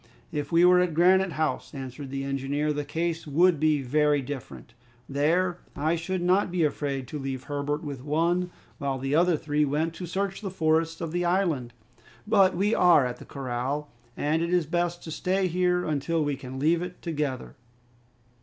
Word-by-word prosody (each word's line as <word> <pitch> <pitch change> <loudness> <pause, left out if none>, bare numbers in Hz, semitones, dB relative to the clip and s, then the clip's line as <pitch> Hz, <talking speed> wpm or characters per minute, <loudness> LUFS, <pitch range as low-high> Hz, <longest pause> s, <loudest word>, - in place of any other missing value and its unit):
"If 145 -1 -3
we 170 +1 +5
were 180 0 +6
at 180 -3 +1
Granite 185 +1 +4
House," 155 0 -2
answered 135 +1 -7
the 135 0 -3
engineer, 140 +2 -1
"the 150 0 -2
case 160 +2 -3
would 165 +2 +3
be 155 -2 +2
very 150 +2 +2
different. 135 -4 -7 0.3
There 170 +6 +1 0.2
I 155 +4 +1
should 175 +2 -3
not 185 +3 +3
be 175 -1 0
afraid 140 -3 -1
to 150 - -5
leave 135 -2 -4
Herbert 145 +2 -3
with 140 -4 -6
one, 170 +5 +1 0.3
while 140 -3 -1
the 135 +2 -3
other 170 +1 +4
three 150 0 0
went 150 +3 0
to 180 +1 -7
search 195 +3 -2
the 200 - -3
forests 165 -2 +1
of 165 - -3
the 175 +1 -1
island. 170 -9 0 0.5
But 195 -4 +4
we 205 +4 +2
are 170 -6 +5
at 125 0 -4
the - - -12
corral, 135 +3 -3 0.3
and 155 +3 +1
it 170 +1 -1
is 180 -2 +2
best 175 +2 -1
to 160 - -7
stay 190 +4 0
here 180 0 +1
until 155 +1 0
we 145 -1 -1
can 130 0 -8
leave 160 +5 +2
it 180 0 -6
together." 150 -7 -3
155 Hz, 185 wpm, -27 LUFS, 140-175 Hz, 0.5 s, were